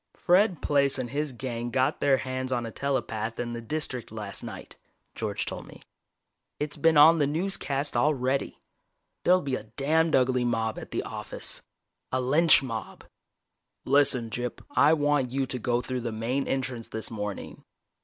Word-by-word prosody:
"Fred 185 -1 +3
Plaice 140 -2 +2
and 125 -2 -4
his 145 +1 -1
gang 120 -1 -4
got 130 +1 +1
their 140 -2 +4
hands 130 0 -4
on 120 -2 0
a 115 - -6
telepath 115 -4 -2
in 120 -1 -3
the 120 - -5
District 130 -2 -4
last 105 -4 -5
night," - - -9 0.4
George - - -3
told - - -6
me. - - -14 0.8
"It's 150 0 -2
been 165 -2 +3
on 160 +3 +8
the 145 - +3
newscast 145 -4 -1
already. 135 0 +1 0.7
There'll 180 +1 +5
be 140 -2 -3
a 110 -4 -2
damned 155 +8 +1
ugly 125 -1 +3
mob 115 -2 -1
at - - -9
the - - -2
office - - -5 0.5
a 130 - +1
lynch 145 +4 +5
mob. 115 -4 -6 0.8
Listen, 135 -5 +3
Gyp, 120 +2 -4
I 140 +5 +5
want 145 -4 +2
you 135 +1 0
to 125 0 -3
go 120 0 0
through 125 0 -3
the 120 -1 -3
main 120 +5 -2
entrance 130 -3 -2
this 110 +1 -4
morning." 105 -2 -5
130 Hz, 165 wpm, -27 LUFS, 120-145 Hz, 0.8 s, on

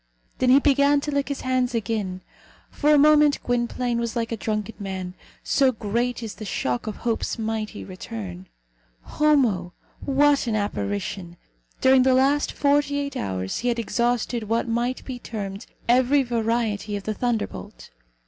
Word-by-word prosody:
Then 255 - +3
he 260 - +8
began 285 0 +4
to 295 - -3
lick 280 -1 -1
his 280 - -3
hands 255 -1 0
again. 205 -5 -2 0.5
For 300 0 +2
a 300 - +6
moment 300 0 +5
Gwynplaine 245 0 -1
was 235 0 -3
like 230 -1 -2
a - - 0
drunken 215 0 -3
man, 190 -2 -5 0.3
so 270 -2 +3
great 235 +2 -2
is 220 -2 -5
the - - -9
shock 125 - -2
of 215 - -3
Hope's 230 0 -2
mighty 220 -1 -3
return. 100 - -8 0.6
Homo! 240 - +2 0.3
What 285 -1 +3
an 225 - 0
apparition! 200 -3 -3 0.4
During 260 0 +6
the 260 0 +4
last 275 +3 +2
forty 285 0 +2
eight 280 0 -3
hours 95 -1 -3
he 245 - -2
had 240 -1 +1
exhausted 235 0 -1
what 230 +2 +1
might 240 +2 -1
be 255 -2 -6
termed 200 -2 -6 0.2
every 255 +3 +4
variety 225 -3 -1
of 200 - -5
the 215 - -2
thunder 235 0 0
bolt. - - -11
235 Hz, 160 wpm, -24 LUFS, 205-260 Hz, 0.6 s, he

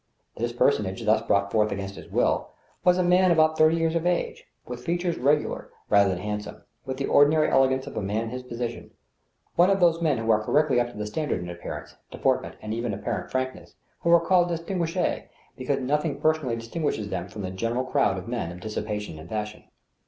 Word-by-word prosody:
This 120 +1 -2
personage, 110 -4 +1
thus 110 +1 +4
brought 100 0 +1
forward 105 -1 +2
against 100 0 -4
his - - -11
will, - - +1 0.3
was 180 0 +4
a 185 - +2
man 180 +1 +4
about 160 -2 +4
thirty 155 +1 +4
years 165 -1 +1
of 170 +1 0
age, 180 -1 -1 0.2
with 125 0 -7
features 175 0 -1
regular 145 +3 +1 0.2
rather 100 -1 +5
than 90 - -1
hand 105 +2 -3
some, - - -11 0.2
with 130 0 -3
the 135 - -1
ordinary 155 +2 +4
elegance 130 0 +3
of - - -9
a - - -1
man 105 +3 -1
in 115 - -5
his 125 0 -5
position 120 -1 -5 0.3
— - - -45
one 175 +2 +6
of 195 0 +3
those 170 -2 +3
men 155 -5 +2
who 115 0 +1
are 110 0 +3
correctly 145 +1 +3
up 120 0 0
to 120 - -12
the 105 - -3
standard 120 - -2
in 90 - -7
appearance, 85 - -8
de - - -9
portment, - - 0
and 110 0 -3
even 115 -2 -2
apparent 100 - -4
frankness, 130 0 -4 0.2
who 170 - -1
are 170 - +8
called 175 +1 +3
^sttngui 170 +1 -1 0.3
because 135 +1 -1
nothing 150 +2 0
personally 155 -6 +1
distinguishes 115 -2 -3
them 90 -1 -3
from 100 +2 -8
the 95 - -4
general 115 +6 -1
crowd 100 -6 +1
of 95 - -7
men 115 -9 -3
of 90 - -9
dissipation 105 -4 -4
and 80 +2 -11
fashion. 105 -1 -5
125 Hz, 215 wpm, -26 LUFS, 105-160 Hz, 0.3 s, are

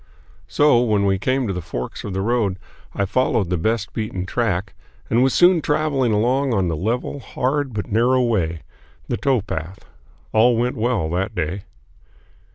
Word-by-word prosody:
So, 145 - +4
when 105 -4 +2
we 95 -1 +1
came 130 +5 0
to 100 - -2
the 90 - -4
forks 65 -5 -6
of 105 - -5
the 95 0 -1
road, 110 -4 0 0.4
I 100 - +1
followed 105 -4 0
the - - +2
best 110 +4 -1
beaten 105 -4 -3
track 100 -3 -1 0.4
and 115 +2 +4
was 130 +1 +3
soon 175 +2 +5
traveling 150 -5 +1
along 125 +4 +1
on 95 -3 +1
the 80 - -1
level, 115 - -2
hard, 135 +1 -2
but 105 -2 -5
narrow 125 +4 +3
way, 85 -9 -1 0.4
the - - -1
towpath. 95 - -2 0.5
All 115 +2 +4
went 125 +2 0
well 110 -7 0
that 95 +4 -2
day. 90 +4 -3
110 Hz, 165 wpm, -21 LUFS, 95-125 Hz, 0.5 s, soon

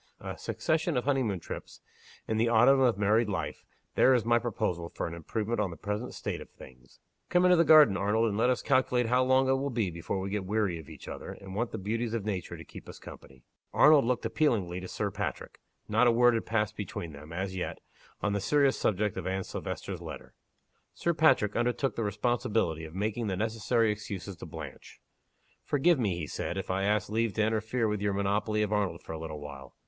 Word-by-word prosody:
A - - -6
succession 160 -1 -1
of 125 - 0
honey 135 -1 +2
moon 100 -7 -1
trips, - - -8 0.5
in 110 - 0
the 115 +1 +2
autumn 120 +4 +6
of 125 -5 +3
married 105 +2 +2
life 100 - -3 0.3
there 130 - +5
is 120 - +1
my 120 0 +4
proposal 90 -7 -2
for - - -4
an 85 - -5
improvement 105 +7 -3
on 105 -3 +1
the 85 - -9
present 105 +7 -4
state - - -4
of - - -11
things! 65 -1 -16 0.3
Come 180 0 +4
into 180 0 +6
the 165 - +5
garden, 155 - +7
Arnold; 105 +4 +2
and 100 - -3
let 115 +4 +3
us 125 - 0
calculate 130 -2 +2
how 125 +3 +3
long 130 +1 +3
it - - +3
will 140 +1 -1
be 115 -8 -1
before 85 +3 -3
we 95 +1 -4
get 105 -1 -1
weary 100 -3 0
of 80 - -12
each - - -11
other, - - -6
and 95 -1 -10
want 115 +4 -1
the - - -5
beauties 115 +4 -2
of 110 -3 -3
nature 95 -5 -3
to - - -10
keep - - -12
us - - -9
company." 65 -2 -13 0.3
Arnold 150 -2 +7
looked 120 0 0
appealingly 100 - +1
to 90 - -7
Sir - - -2
Patrick. - - -5 0.3
Not 110 +4 +3
a - - +6
word 120 +1 +5
had 115 - -2
passed 105 -2 0
between 90 -4 -5
them, 75 +2 -11
as 95 +2 -3
yet, 90 - -3 0.5
on 105 - +1
the 100 - -1
serious 140 +6 +3
subject 105 0 0
of - - -4
Anne 95 +1 -1
Silvester's - - -5
letter. - - -9 0.6
Sir 170 - 0
Patrick 155 -10 +3
undertook 125 +3 0
the 115 - -1
responsibility 105 -6 0
of 80 +2 -11
making 110 +3 -1
the 95 -2 -2
necessary 110 +1 +1
excuses 100 -2 -6
to 90 - -9
Blanche. 80 -2 -9 0.6
"Forgive 145 +2 +3
me," 100 -7 0
he 85 - -3
said, 85 - -4
"if 95 -1 -3
I 95 +1 0
ask 105 0 +1
leave 115 0 0
to 110 - +1
interfere 110 +2 0
with 105 -1 -2
your 105 -1 0
monopoly 105 +2 0
of 105 0 -1
Arnold 100 -5 -1
for - - -8
a 80 - -5
little 80 -2 -6
while. 70 -3 -10
105 Hz, 220 wpm, -29 LUFS, 95-120 Hz, 0.6 s, garden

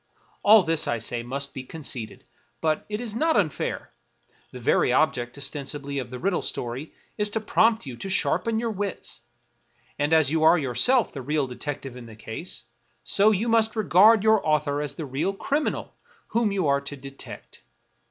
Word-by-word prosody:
All 210 -1 +7
this, 165 -2 +1
I 120 - 0
say, 115 +1 -3
must 140 +4 -4
be 130 - -5
conceded; 130 -5 -5 0.4
but 155 +1 -1
it 210 0 -3
is 230 -3 -4
not 320 +2 +2
unfair; 155 -9 -1 0.6
the 125 - -9
very 120 - +2
object, 125 -2 +1
ostensibly, 140 0 -3
of 125 -2 -5
the 125 - -6
riddle 180 +4 0
story 125 +6 -4 0.3
is 210 0 +2
to 220 - -2
prompt 220 0 +2
you 130 -3 -6
to 195 - -6
sharpen 220 +3 +1
your 230 -1 -1
wits; 205 -2 -5 0.8
and 145 +2 0
as 160 -4 +4
you 160 0 +1
are 160 +2 +6
yourself 150 - +2
the 140 - -6
real 145 +2 0
detective 135 0 -6
in 125 -2 -10
the 110 - -12
case, 120 +4 -6 0.4
so 200 - +4
you 215 +2 0
must 225 -1 +2
regard 210 +1 +5
your 220 -1 +4
author 150 -1 +1
as 150 - -4
the 160 - -5
real 145 +9 -2
criminal 285 +9 -2 0.4
whom 230 -2 +1
you 195 -4 0
are 140 -1 +2
to 140 +1 -6
detect. 135 +1 -11
155 Hz, 180 wpm, -25 LUFS, 135-210 Hz, 0.8 s, All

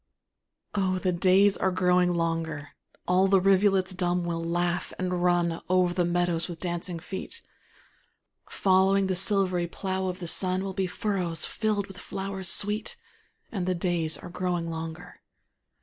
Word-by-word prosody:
Oh, 190 -2 +1
the 185 0 0
days 190 +3 +4
are 190 - +1
growing 180 -1 +3
longer, 165 -3 -2 0.4
All 185 +2 +4
the 195 0 +5
rivulets 195 0 +3
dumb 180 -1 0
will 165 -1 -2
laugh, 175 +1 -1
and 180 -1 -2
run 175 -1 +1
Over 180 -1 +3
the 175 -1 +1
meadows 175 -1 0
with 170 -3 -7
dancing 175 0 -4
feet; 190 - -7 1.1
Following 195 +1 +3
the 190 -1 0
silvery 185 -2 +1
plough 190 +1 -3
of 180 -1 -3
the 180 - -6
sun, 185 +2 +1
Will 195 -1 -4
be 190 -1 -1
furrows 180 -5 -2
filled 215 -3 -1
with 195 -2 -11
wild - - -7
flowers 190 -1 -4
sweet: 210 +4 +1 0.5
And 185 -5 -3
the 185 - +1
days 170 -2 -1
are - - -10
growing 175 -1 -2
longer. 160 +1 -7
180 Hz, 155 wpm, -27 LUFS, 175-190 Hz, 1.1 s, the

